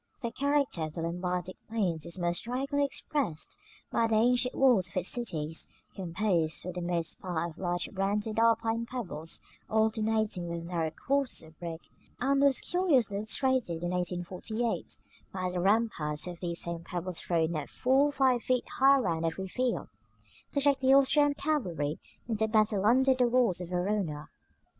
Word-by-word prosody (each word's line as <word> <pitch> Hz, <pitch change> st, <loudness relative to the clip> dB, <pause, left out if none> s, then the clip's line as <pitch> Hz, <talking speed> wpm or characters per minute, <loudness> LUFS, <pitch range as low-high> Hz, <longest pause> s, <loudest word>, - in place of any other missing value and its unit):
The 235 Hz, -, -2 dB
character 280 Hz, -, 0 dB
of 155 Hz, -1 st, -3 dB
the 165 Hz, -, -4 dB
Lombardic 180 Hz, +1 st, -3 dB
plains 185 Hz, -9 st, -1 dB
is 170 Hz, -, -5 dB
most 175 Hz, -1 st, 0 dB
strikingly 275 Hz, +4 st, -1 dB
expressed 275 Hz, -, -3 dB, 0.4 s
by 230 Hz, -, +2 dB
the 225 Hz, -, +1 dB
ancient 245 Hz, +3 st, +3 dB
walls 245 Hz, -9 st, +4 dB
of -, -, -7 dB
its 180 Hz, 0 st, +2 dB
cities, 160 Hz, -10 st, -2 dB, 0.3 s
composed 170 Hz, -3 st, 0 dB
for 180 Hz, -, -4 dB
the 180 Hz, -, -4 dB
most 170 Hz, -2 st, -2 dB
part 170 Hz, -2 st, -2 dB
of 160 Hz, -, -17 dB
large 175 Hz, -1 st, -1 dB
rounded 205 Hz, +3 st, -1 dB
Alpine 230 Hz, 0 st, +2 dB
pebbles 185 Hz, -, -4 dB, 0.3 s
alternating 220 Hz, -4 st, +1 dB
with 170 Hz, 0 st, -4 dB
narrow 170 Hz, -2 st, -1 dB
courses 275 Hz, -, -1 dB
of 160 Hz, -, -24 dB
brick; 170 Hz, -1 st, -6 dB, 0.4 s
and 275 Hz, +2 st, +2 dB
was 280 Hz, -2 st, +4 dB
curiously 285 Hz, -, +2 dB
illustrated 220 Hz, -5 st, 0 dB
in 175 Hz, -, -1 dB
1848, 180 Hz, +6 st, -2 dB, 0.3 s
by 185 Hz, -1 st, -2 dB
the 180 Hz, -, -2 dB
ramparts 190 Hz, -7 st, +1 dB
of 175 Hz, -1 st, -6 dB
these 170 Hz, -2 st, -3 dB
same 170 Hz, -1 st, -5 dB
pebbles 180 Hz, 0 st, -4 dB
thrown 165 Hz, -1 st, 0 dB
up 150 Hz, -, -4 dB
four 265 Hz, +3 st, +3 dB
or -, -, -2 dB
five 260 Hz, -4 st, +2 dB
feet 255 Hz, 0 st, 0 dB
high 275 Hz, +1 st, +7 dB
round 170 Hz, -10 st, 0 dB
every 180 Hz, +4 st, -2 dB
field, 250 Hz, +6 st, -1 dB, 0.6 s
to 280 Hz, -, 0 dB
check 280 Hz, -1 st, +3 dB
the 265 Hz, 0 st, +5 dB
Austrian 285 Hz, +1 st, +4 dB
cavalry 180 Hz, -, -1 dB, 0.3 s
in 225 Hz, -2 st, -1 dB
the 220 Hz, +1 st, +1 dB
battle 215 Hz, -2 st, +2 dB
under 265 Hz, +3 st, +5 dB
the 250 Hz, -1 st, +2 dB
walls 235 Hz, -7 st, +2 dB
of 175 Hz, -, -6 dB
Verona. 180 Hz, -5 st, -2 dB
205 Hz, 165 wpm, -30 LUFS, 175-250 Hz, 0.6 s, high